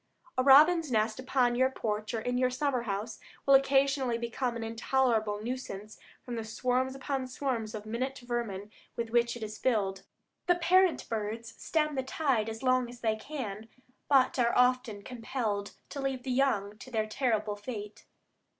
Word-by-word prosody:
A 255 - +2
robin's 300 +3 +7
nest 220 0 +1
upon 255 -2 +2
your 260 +2 +3
porch 215 -3 -3
or 225 - -2
in 245 +2 -1
your 255 0 +3
summer 255 0 0
house 215 0 -4 0.3
will 275 - +5
occasionally 270 -2 +3
become 235 +1 -2
an 230 - -4
intolerable 225 -2 +1
nuisance 215 -4 -6 0.3
from 245 - -4
the 225 - -3
swarms 255 +4 -1
upon 270 -1 -3
swarms 250 -5 -3
of 210 0 -7
minute 255 +5 -3
vermin 215 -4 -3 0.2
with 230 -1 -3
which 235 0 +2
it 230 - -7
is 215 0 -6
filled. 200 -6 0 0.5
The 355 - +5
parent 360 +1 +3
birds 225 +1 -4
stem 305 -2 +1
the 265 - 0
tide 260 -5 0
as 225 +3 -7
long 255 -1 +2
as 245 0 -12
they 220 -2 +1
can, 220 -4 -6 0.4
but 270 -2 +4
are 235 -1 +3
often 250 -4 +2
compelled 225 -4 -3 0.2
to 280 - -5
leave 265 -2 -2
the 260 - -3
young 215 -6 +1
to 260 - -10
their 220 -3 0
terrible 215 -2 0
fate. 210 -1 -8
240 Hz, 170 wpm, -30 LUFS, 220-265 Hz, 0.5 s, robin's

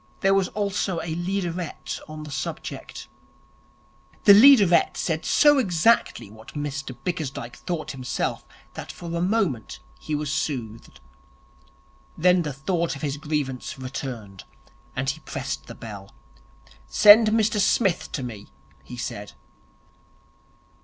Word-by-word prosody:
There 195 0 +4
was 195 -2 +2
also 200 -3 -2
a 165 -1 -4
leaderette 175 -1 -3
on 155 0 -7
the 150 - -9
subject. 135 - -6 1.2
The 200 - +9
leaderette 205 -6 +6
said 160 -1 -2
so 295 -1 +5
exactly 185 - +2
what 110 +5 -14
Mr 140 -3 -4
Bickersdyke 140 -9 -4
thought 170 -4 -4
himself 125 -4 -3 0.3
that - - -7
for 170 -1 -7
a 170 - -1
moment 180 - -1 0.2
he 155 - -3
was 145 -1 -2
soothed. 115 - -4 1.2
Then 180 +2 +4
the 150 -3 -3
thought 165 +5 -2
of 140 - -10
his 145 -1 -2
grievance 145 -5 -3
returned, 125 -7 -7 0.5
and 130 +1 -2
he 145 +4 -1
pressed - - -5
the - - -9
bell. 100 -4 -9 0.8
'Send 215 - +8
Mr 215 -1 +2
Smith 195 -2 +1
to 135 - -3
me,' 110 -5 -7 0.4
he 125 - -10
said. 105 -3 -6
155 Hz, 125 wpm, -24 LUFS, 130-190 Hz, 1.2 s, The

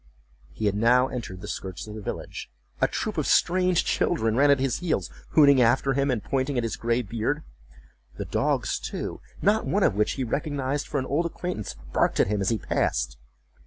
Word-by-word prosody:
He 110 - -4
had 100 - +2
now 125 +5 +4
entered 95 -7 -6
the 105 - -7
skirts 95 -3 -5
of 105 - -9
the 110 - -7
village. - - -6 0.3
A - - +5
troop - - -3
of - - -1
strange 180 0 +3
children 115 -10 +1
ran 145 +3 +4
at 140 -1 +5
his 135 -2 0
heels, 175 -3 -1 0.2
hooting 140 -4 +6
after 130 +3 +3
him, 140 +1 +1
and 120 -5 0
pointing 135 0 -1
at 120 - +1
his 115 - -2
gray 120 +1 0
beard. 120 +8 -2 0.7
The - - -4
dogs, - - 0
too, - - -5 0.2
not 210 +3 +3
one 200 0 +2
of - - +4
which 105 +1 +1
he 135 - -3
recognized 140 +2 -2
for 150 - -2
an 130 - -3
old 155 +6 0
acquaintance, 170 - -5 0.2
barked - - +2
at - - +3
him 105 -1 0
as 95 - +1
he 115 - +1
passed. 80 - -1
130 Hz, 200 wpm, -26 LUFS, 110-145 Hz, 0.7 s, hooting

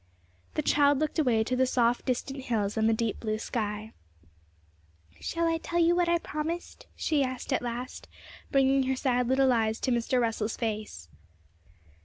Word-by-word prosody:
The 305 - 0
child 285 0 +4
looked 310 +3 -1
away 240 -7 +3
to 255 +3 -1
the 260 0 +2
soft 240 -1 +1
distant 265 +1 -3
hills 210 -4 -1
and 220 0 +2
the - - +4
deep 225 -1 -1
blue 215 -1 -2
sky. 215 -1 -4 1.3
'Shall 335 0 -1
I 330 0 +1
tell 340 - -3
you 340 0 +4
what 350 -1 +2
I 340 - +4
promised?' 330 +2 -5
she 300 -3 +1
asked 255 +1 -3
at - - +1
last, 245 +1 -5 0.4
bringing 270 0 +4
her 265 - +1
sad 250 -2 +1
little 260 0 +4
eyes 220 -1 +1
to 260 - 0
Mr. 240 +1 +1
Russell's 225 -2 -1
face. 215 - -4
255 Hz, 170 wpm, -28 LUFS, 225-285 Hz, 1.3 s, child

